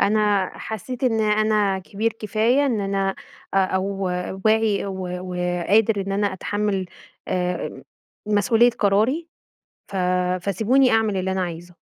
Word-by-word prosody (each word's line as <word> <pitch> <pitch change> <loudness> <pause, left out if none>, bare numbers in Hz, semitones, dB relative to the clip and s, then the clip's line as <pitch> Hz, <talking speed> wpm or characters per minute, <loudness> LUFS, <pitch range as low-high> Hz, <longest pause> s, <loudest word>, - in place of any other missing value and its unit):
أنا 205 -2 +2
حسّيت 240 +4 -5
إن 225 -3 +2
أنا 210 -2 +2
كبير 205 +4 -2
كفاية، 225 +6 +1
إن 235 -6 0
أنا 195 -1 -1 0.4
أو 190 -1 +2 0.6
واعي 220 -2 +2
و 190 -2 -4
و 180 0 -6 0.3
قادر 215 0 +4
إن 195 - -2
أنا 200 0 0
أتحمل، 200 0 -2 0.4
آمم، 180 -1 -2 0.4
مسؤوليّة 225 +3 +4
قراري، 230 +10 +1 0.6
ف 200 - -6 0.5
فسيبوني 225 +8 +3
أعمل 220 -2 +2
اللي 190 0 -1
أنا 190 0 0
عايزه. 175 0 -6
205 Hz, 125 wpm, -23 LUFS, 190-220 Hz, 0.6 s, قادر